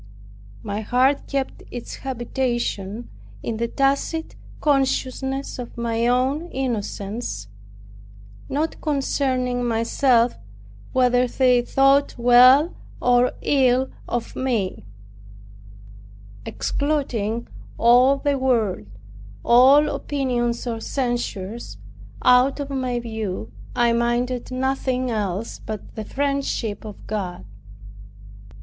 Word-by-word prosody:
My 205 +1 -3
heart 255 +5 +2
kept 275 -2 -3
its 245 -1 -7
habitation 240 -4 -3 0.4
in 225 - -3
the 235 +1 -1
tacit 275 +6 0 0.2
consciousness 270 -1 0
of 240 -1 -8
my 235 0 0
own 265 +7 +1
innocence, 210 - -4 1.0
not 305 +4 -2
concerning 260 -4 0
myself 235 +1 +2 0.5
whether 250 -1 +3
they 250 0 +3
thought 275 +3 +3
well 250 +6 +6 0.3
or 245 0 +3
ill 260 -2 +2 0.2
of 240 -1 -3
me; 230 - -2 1.6
excluding 235 - -1 0.3
all 250 +4 +5
the 280 -1 0
world, 225 - 0 0.6
all 265 +5 +6
opinions 250 -6 -1
or 230 -2 -3
censures, 235 - -3 0.5
out 250 +3 +5
of 285 -1 -4
my 255 -3 -1
view, 220 - -5 0.2
I 235 -1 +3
minded 240 +1 0
nothing 255 -1 -1
else 205 0 -3
but 215 -2 -7
the 220 - -6
friendship 275 -7 -2
of 210 -2 -10
God. 185 - -4
245 Hz, 95 wpm, -22 LUFS, 230-270 Hz, 1.6 s, well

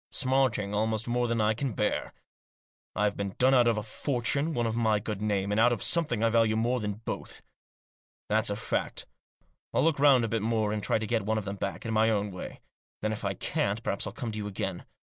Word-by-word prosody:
Smarting 130 -7 +1
almost 110 +1 0
more 120 0 +1
than 115 -1 0
I 110 0 +3
can 125 +2 -3
bear. 105 - -1 0.8
I've 105 -1 +1
been 100 -1 -4
done 130 +2 +4
out 125 -2 +5
of 115 -2 +2
a 105 - -2
fortune, 140 +6 -1
out 120 - +1
of 115 -1 -1
my 110 -2 +2
good 105 -1 -5
name, 100 -2 0
and 105 - +1
out 120 +1 +5
of 115 -5 -1
something 150 -10 +2
I 115 - +4
value 115 -1 +3
more 120 +3 +1
than 105 -2 -2
both. - - -5 0.8
That's - - +2
a - - -1
fact. - - -2 0.7
I'll - - +3
look 160 -3 +2
round 135 -4 +6
a - - -1
bit 115 0 -1
more, 110 -1 0
and 105 - -2
try - - +1
to 110 - -3
get 115 0 0
one 110 +2 -1
of 110 - -3
them 100 0 -4
back, 100 +3 -4
in 110 - -2
my 110 +1 +4
own 105 -2 0
way. 90 - -8 0.4
Then, 110 0 0
if 105 - -7
I - - -1
can't, - - -1
perhaps - - -2
I'll - - -6
come 115 - -4
to 105 - -4
you 105 - -4
again. 95 -2 -4
110 Hz, 235 wpm, -29 LUFS, 105-120 Hz, 0.8 s, round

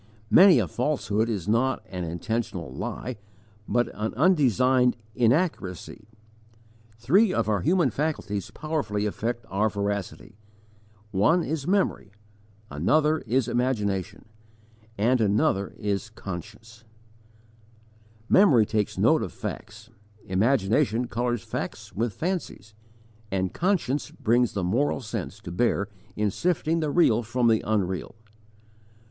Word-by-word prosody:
Many 185 -1 +8
a - - +1
falsehood 115 -7 -1
is 100 -5 -3
not 120 +5 +1
an 90 -2 -4
intentional 85 - -4
lie, 125 - -5 0.5
but 120 0 +1
an 110 +1 -4
undesigned 130 - +3 0.2
inaccuracy. 115 - -1 0.9
Three 185 - +3
of - - 0
our 105 -3 +1
human 170 - +2
faculties 110 - -3
powerfully 145 -10 -2
affect 120 +3 -3
our 105 +3 +1
veracity: 100 +1 -4 0.7
one 115 - +3
is 150 -2 -3
memory, 195 - 0 0.6
another 150 - +2
is 125 +2 +1
imagination, 105 -6 -1 0.7
and 120 +4 +2
another 100 -1 +1
is 105 +1 -2
conscience. 110 +3 -9 1.4
Memory 140 - +5
takes 105 -1 -1
note - - +4
of - - -4
facts, 110 +1 -8 0.3
imagination 115 +4 +1
colours 120 -2 -2
facts - - -6
with 115 +2 -1
fancies, 160 - -4 0.6
and 95 -2 -1
conscience 170 -7 0
brings 120 +1 +1
the 100 - -2
moral 125 +10 0
sense 105 - -5
to - - -8
bear 100 +1 0 0.3
in 105 -1 0
sifting 165 - 0
the 155 -2 -1
real 140 -8 +3
from 120 +2 0
the 110 -1 +3
unreal. 100 -3 -2
115 Hz, 115 wpm, -26 LUFS, 100-140 Hz, 1.4 s, Many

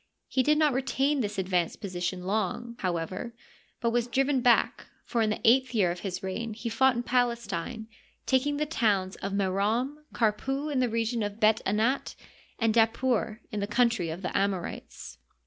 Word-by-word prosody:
He 260 - +1
did 300 +4 +3
not 305 -3 +3
retain 270 +2 +1
this 210 -2 -3
advanced 180 -3 0
position 180 -2 -3
long, 220 +4 -2
however, 185 +6 -3 0.4
but 235 -1 0
was 240 0 +1
driven 270 +1 +1
back, 240 -1 +3 0.2
for 235 - 0
in 220 - +2
the 215 - -1
eighth 255 +1 +4
year 190 -5 +3
of 175 - -5
his 185 -1 -5
reign 215 +4 -4
he 230 +1 -4
fought 260 +3 +3
in 240 - -2
Palestine, 235 -4 -1 0.4
taking 280 +2 +1
the 300 - 0
towns 205 -10 +1
of 195 - -4
Merom^ 205 +8 0
Karpu 270 +7 0
in 275 - +1
the 250 -1 +2
region 230 +1 -1
of 205 +1 -3
Bet 220 0 +4
Anat, 220 +7 0 0.4
and 225 -2 +2
Dapur 230 0 +1
in 210 - -3
the 200 - -2
country 230 -5 +2
of 170 +4 -6
the 180 - -3
Amorites. 195 -3 -3
225 Hz, 175 wpm, -28 LUFS, 195-250 Hz, 0.4 s, eighth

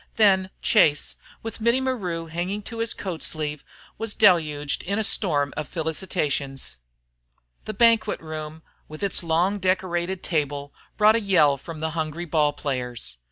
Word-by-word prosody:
Then 190 -3 +4
Chase, 150 -1 +3 0.3
with 225 0 -6
Mittie 235 +3 +3
Maru 195 -11 -2
hanging 175 +5 -3
to 230 +2 -7
his 230 0 0
coat 180 -5 -4
sleeve, 150 -2 -3 0.4
was 225 -1 0
deluged 155 -8 +3
in 200 +3 -2
a 220 - +1
storm 145 -9 +2
of 155 - -4
felicitations. 150 - -2 0.9
The 215 - -5
banquet 230 -1 +4
room, 155 0 -7 0.2
with 155 +5 -9
its 200 - +1
long 175 +4 +1
decorated 185 -1 -1
table, 145 -3 -2 0.2
brought 215 +1 +6
a - - -1
yell 165 -8 +4
from 155 +3 -9
the 160 0 -1
hungry 160 +1 -3
ball 150 -2 +2
players. 125 - -4
170 Hz, 150 wpm, -24 LUFS, 150-200 Hz, 0.9 s, brought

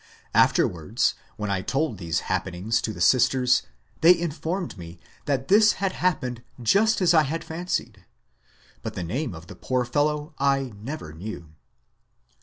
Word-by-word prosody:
Afterwards, 105 +10 +2 0.2
when 105 -1 -3
I 95 -1 0
told 135 - -1
these 85 -3 -1
happenings 95 +6 -1
to 110 - -2
the 100 - -9
sisters, 125 +3 +4 0.4
they 170 +2 +7
informed 170 +2 -3
me 85 -2 -10 0.3
that 135 -2 -1
this 215 +4 +6
had 195 0 -1
happened 130 -11 -1 0.2
just 200 - +3
as 175 -2 +4
I 160 - +6
had 160 +3 -2
fancied. 170 +3 -4 0.8
But - - -6
the 90 - -3
name 120 - -3
of 80 +1 -11
the 105 - -11
poor 130 -1 -1
fellow 150 +4 0
I 135 -3 +1
never 110 - -7
knew. 85 -2 -8
130 Hz, 150 wpm, -25 LUFS, 105-160 Hz, 0.8 s, they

